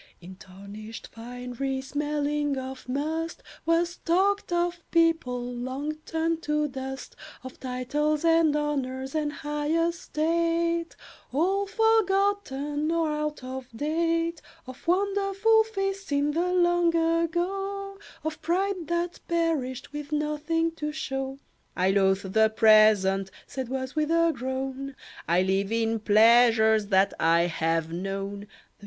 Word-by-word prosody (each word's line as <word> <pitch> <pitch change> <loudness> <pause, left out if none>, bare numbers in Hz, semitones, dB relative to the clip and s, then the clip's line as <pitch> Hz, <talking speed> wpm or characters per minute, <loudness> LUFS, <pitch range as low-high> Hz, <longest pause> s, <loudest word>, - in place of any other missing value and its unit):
In 180 +2 -11
tarnished 200 +4 -10
finery 250 +3 -5
smelling 290 +1 -1
of 260 -1 -7
must, 315 +5 -3 0.2
Was 340 +1 +2
talked 390 +3 +1
of 345 0 0
people 325 -8 +2
long 260 +5 -3
turned 325 0 -1
to 300 -2 0
dust; 265 -1 -7 0.3
Of 260 - -10
titles 290 +5 -1
and 325 -2 +4
honours 270 -3 -2
and 305 -2 0
high 295 0 -4 0.2
estate, 335 0 0 0.4
All 380 +8 +1
forgotten 390 - +1
or 330 -2 +1
out 300 -2 -3
of 260 0 -6
date; 330 +3 0 0.2
Of 255 +3 -12
wonderful 400 +4 +3
feasts 390 -4 -3
in 285 +1 +2
the 345 +4 0
long 350 -1 +3
ago, 365 +4 -1 0.2
Of 315 0 -4
pride 370 0 -1
that 345 0 -2
perished 300 -7 -1
with 295 0 -6
nothing 300 +2 0
to 300 0 -3
show. 270 -2 -4 0.4
"I 185 +1 +3
loathe 190 -1 +1
the 220 0 +5
present," 215 -3 +5 0.2
said 260 -3 -5
Was, 260 +1 -4
with 305 0 0
a 335 0 +3
groan; 265 +1 -4 0.3
"I 175 +2 +3
live 195 +2 0
in 225 0 0
pleasures 220 0 +5
that 195 -1 +3
I 165 +1 +4
have 165 -1 0
known." 195 +3 -4
295 Hz, 125 wpm, -27 LUFS, 245-335 Hz, 0.4 s, the